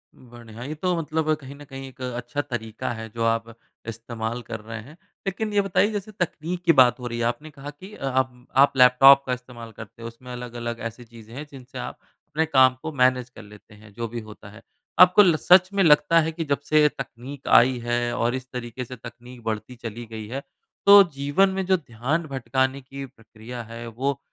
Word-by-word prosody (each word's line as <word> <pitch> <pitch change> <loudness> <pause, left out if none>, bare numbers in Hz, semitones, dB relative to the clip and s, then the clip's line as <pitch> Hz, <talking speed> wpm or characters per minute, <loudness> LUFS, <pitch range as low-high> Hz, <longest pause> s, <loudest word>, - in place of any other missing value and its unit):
बढ़िया। 120 -2 -12
ये 150 +4 -5
तो 180 +3 0
मतलब 155 0 0
कहीं 135 +1 -10
न 145 - -12
कहीं 135 -1 -8
एक 130 -1 -15
अच्छा 125 +2 -3
तरीका 115 -6 -5
है, 110 0 -7
जो 115 +1 -4
आप 115 0 0 0.3
इस्तेमाल 115 +1 -5
कर 115 -1 -7
रहे 115 +1 -7
हैं। 145 +8 -15 0.3
लेकिन 210 +2 -2
ये 205 - +4
बताइए, 200 +2 +2
जैसे 205 0 -5
तकनीक 180 -3 -4
की 170 - +7
बात 130 -3 +5
हो 125 - -5
रही 120 0 -4
है। 115 - 0
आपने 150 +6 -3
कहा 140 0 -9
कि 185 +8 -12
अ, - - -6
आप 130 -1 -1
आप 140 +1 +6
लैपटॉप 135 +2 +8
का 130 - -1
इस्तेमाल 125 -2 -9
करते 110 +1 -12
हों, 115 - -5
उसमें 120 +2 -11
अलग-अलग 120 -1 -6
ऐसी 120 +2 -14
चीज़ें 115 -1 -14
हैं, 145 +3 -6
जिनसे 130 -1 -11
आप 125 - -6 0.3
अपने 155 +2 0
काम 130 -3 +5
को 160 - -4
मैनेज 125 -3 +2
कर 125 - -13
लेते 105 +1 -16
हैं, 105 0 -17
जो 115 +2 -4
भी 120 +1 -6
होता 105 -1 -12
है। 105 +2 -14 0.4
आपको 180 +3 +8
ल 175 -5 +4
सच 185 +3 +5
में 200 -1 +3
लगता 165 +1 +5
है 160 +1 -1
कि 165 +1 -4
जब 140 -1 0
से 155 -1 +5
तकनीक 135 +4 -8
आई 125 +2 +5
है 120 0 0
और 120 +2 0
इस 130 -1 -6
तरीके 125 0 -5
से 125 - -9
तकनीक 120 +1 -12
बढ़ती 110 +2 -4
चली 120 0 -7
गई 110 -1 -8
है, 130 +5 -5 0.4
तो 200 0 +10
जीवन 145 +8 +2
में 190 0 -2
जो 190 0 +3
ध्यान 140 +2 -2
भटकाने 130 0 -1
की 135 +1 -8
प्रक्रिया 115 0 -10
है, 115 +1 -9
वो 135 +5 -2
125 Hz, 215 wpm, -24 LUFS, 115-145 Hz, 0.4 s, तो